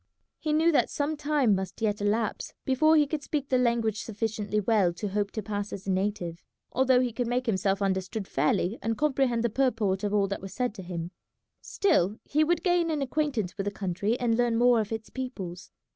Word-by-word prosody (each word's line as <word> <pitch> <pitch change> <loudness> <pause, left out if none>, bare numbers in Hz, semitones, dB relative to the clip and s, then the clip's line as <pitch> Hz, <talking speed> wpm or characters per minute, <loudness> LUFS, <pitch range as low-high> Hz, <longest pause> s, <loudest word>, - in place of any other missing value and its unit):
He 310 - -2
knew 320 +2 +4
that 295 - +3
some 295 +2 -1
time 290 -6 +2
must 190 -1 -3
yet 210 -2 0
elapse 210 +2 -1
before 310 +5 +4
he 300 - +5
could 295 +1 -3
speak 290 -2 -3
the 255 - +3
language 230 -3 +1
sufficiently 210 -1 -2
well 200 -4 +2
to 205 +4 -4
hope 200 +1 -1
to 215 - -3
pass 205 0 -3
as 195 - -7
a 195 - 0
native, 185 -3 -2 0.3
although 260 0 +4
he 245 -2 -1
could 245 0 -2
make 250 +1 0
himself 200 -2 +1
understood 190 +1 -2
fairly 175 - 0
and 225 +1 -1
comprehend 270 -5 +1
the 235 - +2
purport 220 -6 +1
of 205 - 0
all 205 -1 +3
that 200 - -3
was 190 0 -8
said 250 -3 -1
to 200 - -8
him; 175 -1 -5 0.5
still 210 - +1
he 305 +2 +2
would 340 +1 +1
gain 350 -3 +2
an 300 -3 0
acquaintance 265 - -1
with 195 - -1
the 205 - -1
country 200 +4 -2
and 235 -1 +1
learn 240 -1 +2
more 240 -1 +5
of 210 - -6
its 220 -1 -5
peoples. 195 -9 -6
225 Hz, 210 wpm, -28 LUFS, 200-260 Hz, 0.5 s, he